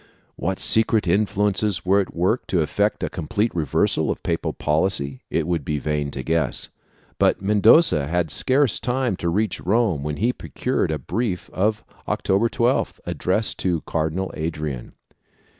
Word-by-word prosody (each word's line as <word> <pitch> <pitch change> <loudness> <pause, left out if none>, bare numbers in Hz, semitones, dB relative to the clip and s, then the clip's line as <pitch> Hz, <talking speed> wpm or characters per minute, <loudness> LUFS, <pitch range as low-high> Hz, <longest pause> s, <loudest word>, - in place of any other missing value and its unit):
What 95 - -2
secret 110 -3 +3
influences 105 +1 +1
were 95 +2 +4
at 95 - -7
work 95 +8 0
to 90 - +1
effect 100 +7 0
a - - +1
complete 105 +7 -1
reversal 80 -4 +1
of - - -3
papal - - -1
policy 75 -4 -1
it 80 - 0
would 85 -3 -1
be 75 +1 -2
vain 75 0 -2
to 65 -1 -6
guess, 80 +2 0 0.5
but - - +3
Mendoza 105 - +4
had 85 -1 0
scarce 130 -2 +2
time 125 -3 0
to 85 - -1
reach 105 +3 0
Rome 100 -5 +1
when 75 0 -3
he 120 +5 +1
procured 125 -9 -2
a 80 - -1
brief 95 - -3
of 105 +3 0 0.2
October 100 +5 +1
12th, 120 +3 0
addressed 105 +4 -1
to 85 -4 0
Cardinal 80 +6 -2
Adrian. 75 -5 -4
95 Hz, 155 wpm, -22 LUFS, 80-110 Hz, 0.5 s, were